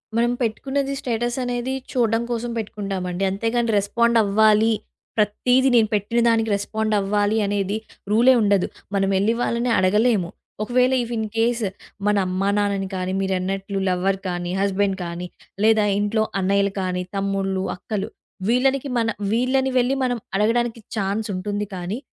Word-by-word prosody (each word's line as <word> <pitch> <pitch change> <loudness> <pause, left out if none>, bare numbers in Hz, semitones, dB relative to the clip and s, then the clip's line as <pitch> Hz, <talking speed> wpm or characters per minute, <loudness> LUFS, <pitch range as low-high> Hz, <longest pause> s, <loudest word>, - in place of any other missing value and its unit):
మనం 235 +1 +2
పెట్టుకున్నది 270 +4 -1
స్టేటస్ 240 0 -2
అనేది 245 +1 -2 0.2
చూడ్డం 230 -2 +1
కోసం 240 0 -2
పెట్టుకుంటామండి. 195 -4 -3
అంతేగాని 225 +4 0
రెస్పాండ్ 235 +4 +2
అవ్వాలి. 215 +2 +4 0.4
ప్రతీది 250 +5 +3
నేను 225 -2 +5
పెట్టిన 210 +3 0
దానికి 225 -1 +2
రెస్పాండ్ 215 +2 -2
అవ్వాలి 205 +2 +1
అనేది 200 0 -1 0.3
రూలే 240 +4 +6
ఉండదు. 200 -3 +2 0.3
మనం 195 0 +2
ఎళ్ళి 205 +4 +2
వాళ్ళని 235 +1 0
అడగలేము. 200 0 +2 0.3
ఒకవేళ 250 +3 +2
ఇఫ్ 240 0 -5
ఇన్‌కేస్ 225 +2 0 0.4
మన 210 - +3
అమ్మా 185 +2 0
నాన్నని 200 -2 0
కానీ, 185 0 -2
మీరన్నట్లు 195 +1 -2
లవ్వర్ 190 +2 0
గానీ, 175 0 -3
హస్బెండ్ 200 0 +1
గానీ, 170 +1 -5 0.4
లేదా 220 -1 +5 0.2
ఇంట్లో 215 +1 +1 0.2
అన్నయ్యలు 200 +1 +2
కానీ, 180 -1 -2
తమ్ముళ్ళు, 195 -1 -1
అక్కలు 205 +3 -4 0.4
వీళ్ళనికి 265 +3 +2
మన 230 -1 +1 0.2
వీళ్ళని 260 +3 +2
వెళ్ళి 250 +1 +2
మనం 245 -1 0 0.2
అడగడానికి 230 +3 +1 0.2
ఛాన్స్ 205 +1 -1
ఉంటుంది 205 +2 -2
కానీ 180 +4 -4
210 Hz, 135 wpm, -22 LUFS, 195-235 Hz, 0.4 s, రూలే